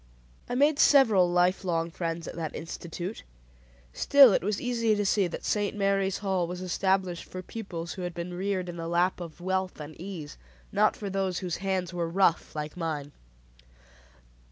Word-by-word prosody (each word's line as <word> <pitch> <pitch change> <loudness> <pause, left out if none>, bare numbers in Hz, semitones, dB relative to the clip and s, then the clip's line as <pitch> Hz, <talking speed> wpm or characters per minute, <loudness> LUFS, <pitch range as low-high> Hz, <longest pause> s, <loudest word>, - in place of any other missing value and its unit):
I 245 - -1
made 290 +3 +3
several 220 -11 +6
life 180 +2 +2
long 165 -2 -1
friends 165 -1 -4
at - - -7
that 160 -3 -4
institute; 170 +4 -6 0.7
still 275 - +7
it - - +1
was 205 +1 -1
easy 230 -3 +1
to 205 0 -1
see 195 -1 +2
that 175 - -7
"St. 205 0 0
Mary's 195 -1 +1
Hall" 185 -3 +1
was 180 +1 -5
established 185 0 0
for 185 0 -8
pupils 175 -6 -6
who 190 - -7
had 175 -1 -4
been 175 +1 -5
reared 185 0 -2
in 175 -1 -6
the 165 0 -4
lap 175 +2 +1
of 170 -2 -8
wealth 185 0 -2
and 150 +1 -8
ease; 175 - -7 0.3
not - - +3
for 200 -2 -5
those 190 -2 -1
whose 175 - -2
hands 185 -2 -2
were 170 -1 -2
rough 175 -2 +2
like 150 0 -4
mine. 155 -4 -3
180 Hz, 180 wpm, -28 LUFS, 170-195 Hz, 0.7 s, still